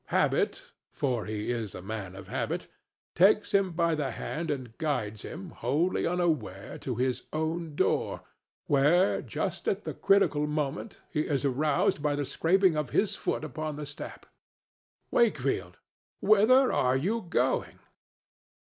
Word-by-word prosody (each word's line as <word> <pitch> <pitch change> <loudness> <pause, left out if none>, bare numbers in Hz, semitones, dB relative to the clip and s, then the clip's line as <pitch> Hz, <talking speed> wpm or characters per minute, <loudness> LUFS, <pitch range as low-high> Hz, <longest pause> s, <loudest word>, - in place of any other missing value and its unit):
Habit—for 125 -5 -1
he 105 +1 -3
is 115 -5 -3
a 90 - -7
man 100 -2 -5
of 95 -1 -10
habits—takes 195 - 0
him 195 -2 +3
by 170 0 +2
the 150 -3 -1
hand 165 +5 -4
and 130 -5 -4
guides 110 -9 -1
him, 175 +1 -8
wholly 150 +11 0
unaware, 155 - -1
to 125 - -3
his 125 +1 -1
own 160 0 -2
door, - - 0 0.4
where, 150 +7 +3
just - - -4
at - - 0
the - - -4
critical 155 -7 +3
moment, 150 +6 -3
he 150 -1 0
is 145 -1 0
aroused 145 +2 +1
by 145 -1 +1
the 145 0 -1
scraping 175 +5 +3
of 150 -4 -1
his 210 - +1
foot - - -2
upon 155 +1 -4
the 150 0 -5
step.—Wakefield, 140 - -3 0.4
whither 220 +6 +5
are 130 +1 +3
you 205 +12 0
going? - - 0
150 Hz, 135 wpm, -29 LUFS, 125-175 Hz, 0.4 s, whither